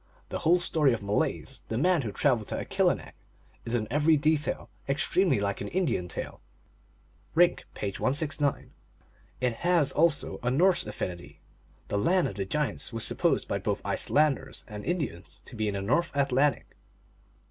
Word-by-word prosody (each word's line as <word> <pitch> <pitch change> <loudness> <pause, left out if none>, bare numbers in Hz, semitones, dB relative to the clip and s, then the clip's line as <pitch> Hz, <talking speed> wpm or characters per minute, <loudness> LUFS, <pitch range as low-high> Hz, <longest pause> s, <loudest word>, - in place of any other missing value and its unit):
The - - -3
whole 175 +3 +4
story 155 -6 +2
of 110 - -4
Malaise, 100 +1 -1
the 110 - -3
man 175 +4 +3
who 110 -5 -4
traveled 120 -3 +1
to - - -3
Akilinek, - - 0 0.5
is 115 - -1
in 110 -3 -1
every 150 +3 +4
detail 155 0 0 0.2
extremely 165 - +2
like 100 0 -2
an - - -3
Indian 155 - 0
tale. - - -6 0.9
(Rink, 175 +1 +4
page 100 -2 -4
169.) 145 +1 0 0.7
It 125 -2 +1
has 170 -5 +2
also 160 -1 +1
a 125 - 0
Norse 170 - +3
affinity. 90 -4 -6 0.5
The 100 - 0
land 180 - +3
of - - -5
the 95 0 -3
giants 150 +5 -2
was 115 -2 -3
supposed - - +1
by - - -1
both - - -1
Iceland 150 -2 +2
ers - - -11
and 105 -2 -7
Indians 150 - -4
to 125 - -11
be 110 -1 -1
in 100 - -1
the 100 - -2
North 145 +11 +1
Atlantic. 140 -1 +1
140 Hz, 165 wpm, -28 LUFS, 110-160 Hz, 0.9 s, whole